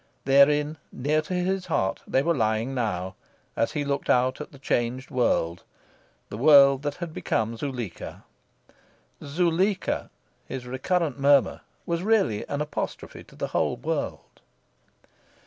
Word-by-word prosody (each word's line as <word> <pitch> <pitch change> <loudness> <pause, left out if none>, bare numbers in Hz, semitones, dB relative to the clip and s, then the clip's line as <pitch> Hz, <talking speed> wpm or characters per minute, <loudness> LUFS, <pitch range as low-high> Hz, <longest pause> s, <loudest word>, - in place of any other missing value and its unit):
Therein, 145 +3 +4
near 150 +4 0
to 155 +4 -6
his 185 +1 -1
heart, 95 - 0
they 135 - +2
were 170 +2 +2
lying 110 0 0
now, 95 -7 -2 0.4
as 115 - 0
he 145 -2 -2
looked 140 0 -2
out 130 +2 +2
at 150 - -8
the 140 - -14
changed 130 0 -2
world 90 -10 +1 0.7
the 105 - -6
world 140 -1 +7
that 145 -1 -3
had 175 -3 -6
become 115 -5 -1
Zuleika. 120 -6 -6 1.0
"Zuleika!" 175 +6 0 0.4
his 130 -1 -6
recurrent 140 +3 -1
murmur, 140 -1 +3 0.2
was 170 0 -1
really 195 - +2
an 145 - -2
apostrophe 150 - -5
to - - -18
the - - -4
whole - - 0
world. - - -4
140 Hz, 135 wpm, -26 LUFS, 125-155 Hz, 1.0 s, world